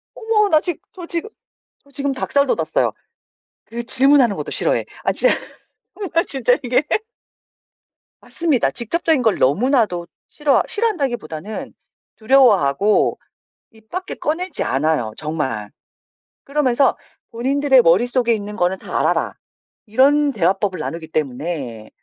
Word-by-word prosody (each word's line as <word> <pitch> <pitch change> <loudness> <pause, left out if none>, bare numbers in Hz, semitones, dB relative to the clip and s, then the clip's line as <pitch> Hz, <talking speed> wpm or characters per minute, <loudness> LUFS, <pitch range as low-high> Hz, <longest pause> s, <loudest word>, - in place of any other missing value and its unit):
어머 440 -2 +1
나 310 - +5
지금 350 -4 -2
저 355 -2 -8
지금 340 +5 -2 0.6
저 280 - -23
지금 280 0 -1
닭살 280 +2 0
돋았어요. - - 0 0.7
그 235 +2 -6
질문하는 260 -2 +4
것도 - - -5
싫어해. - - +1 0.2
아 - - +2
진짜 - - +3 0.8
나 335 - +4
진짜 255 -5 +1
이게 250 +2 +2 1.4
맞습니다. 315 -7 0
직접적인 315 +4 0
걸 220 -4 +2
너무나도 195 - +1 0.2
싫어 295 -2 +2
싫어한다기보다는 240 - -3 0.4
두려워하고 210 - +3 0.5
입 220 -1 -22
밖에 370 +1 -5
꺼내지 355 +5 -2
않아요, 135 -5 0
정말. 135 -10 -3 0.7
그러면서 275 -2 +1 0.3
"본인들의 265 +2 +3
머릿속에 235 +7 +3
있는 210 -1 -5
거는 180 -1 0
다 - - -4
알아라." - - 0 0.5
이런 280 +6 +3
대화법을 190 -1 0
나누기 165 -1 -5
때문에. 140 -6 -4
240 Hz, 290 characters per minute, -19 LUFS, 175-285 Hz, 1.4 s, 나